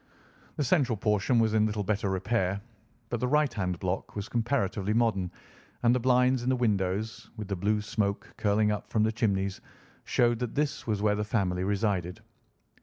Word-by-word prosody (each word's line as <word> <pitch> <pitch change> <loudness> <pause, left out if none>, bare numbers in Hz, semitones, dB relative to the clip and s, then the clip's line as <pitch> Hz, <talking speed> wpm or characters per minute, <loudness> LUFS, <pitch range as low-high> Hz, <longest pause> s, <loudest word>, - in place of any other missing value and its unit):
The 150 - 0
central 130 -5 +2
portion 105 +4 +1
was 110 -1 +3
in 110 0 +3
little 105 -1 -2
better 100 0 0
repair, 95 0 0 0.5
but 120 - -2
the 125 - 0
right 150 +1 +2
hand 90 -4 -2
block 95 +2 -3
was 100 0 -4
comparatively 105 -4 0
modern, 110 -6 +1 0.5
and 120 0 +5
the 125 - +2
blinds 125 +1 +3
in 125 - -1
the 130 - +3
windows, 105 -1 -1
with 105 -2 -5
the 100 - 0
blue 105 +3 0
smoke 100 -1 -2
curling 105 0 +2
up 105 - -4
from 110 - +2
the 110 - +2
chimneys, 100 -4 -1 0.4
showed 120 -1 +2
that 125 -2 -3
this 145 -3 -1
was 105 -2 -1
where 105 -1 +4
the 105 0 -1
family 95 -4 0
resided. 95 -3 -1
105 Hz, 180 wpm, -29 LUFS, 100-120 Hz, 0.5 s, and